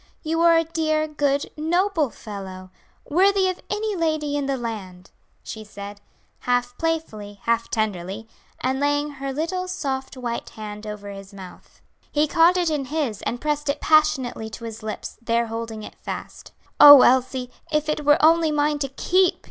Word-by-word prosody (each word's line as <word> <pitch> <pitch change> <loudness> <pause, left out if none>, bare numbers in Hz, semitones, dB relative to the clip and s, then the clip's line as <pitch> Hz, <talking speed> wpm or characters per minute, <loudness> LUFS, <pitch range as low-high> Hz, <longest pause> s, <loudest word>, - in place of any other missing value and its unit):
You 325 +1 -1
are 335 -1 +6
a 330 - +3
dear, 310 -1 0
good, 285 -2 -1
noble 330 0 +1
fellow, 190 -4 -9 0.4
worthy 385 +4 +3
of 370 - -4
any 420 0 -2
lady 310 -4 -1
in 285 -1 -1
the 275 -1 0
land," 195 -6 -7 0.3
she 220 - -7
said, 205 -1 -9 0.4
half 245 0 0
playfully, 220 -12 -3
half 230 0 0
tenderly 210 0 -3 0.3
and 260 +1 0
laying 290 +1 0
her 275 -1 -5
little 340 +6 -2
soft 270 -7 -4
white 240 -2 -4
hand 210 0 -8
over 205 -1 -7
his 195 0 -11
mouth. 185 -2 -13 0.3
He 300 +1 +2
caught 335 +3 +4
it 345 -3 +1
in 290 -3 -1
his 275 -8 -2
and 240 - -2
pressed 295 0 -2
it 280 - 0
passionately 300 -8 +2
to 220 - -10
his 225 -1 -7
lips, 215 0 -6
there 235 0 +1
holding 225 -1 -5
it - - -9
fast. - - -8 0.3
"Oh, 290 -2 +11
Elsie, 255 0 +2 0.2
if 300 0 +1
it 305 0 -1
were 295 0 +5
only 325 0 +5
mine 295 0 +1
to 275 - -1
keep!" 365 +7 +2
275 Hz, 170 wpm, -23 LUFS, 220-310 Hz, 0.4 s, Oh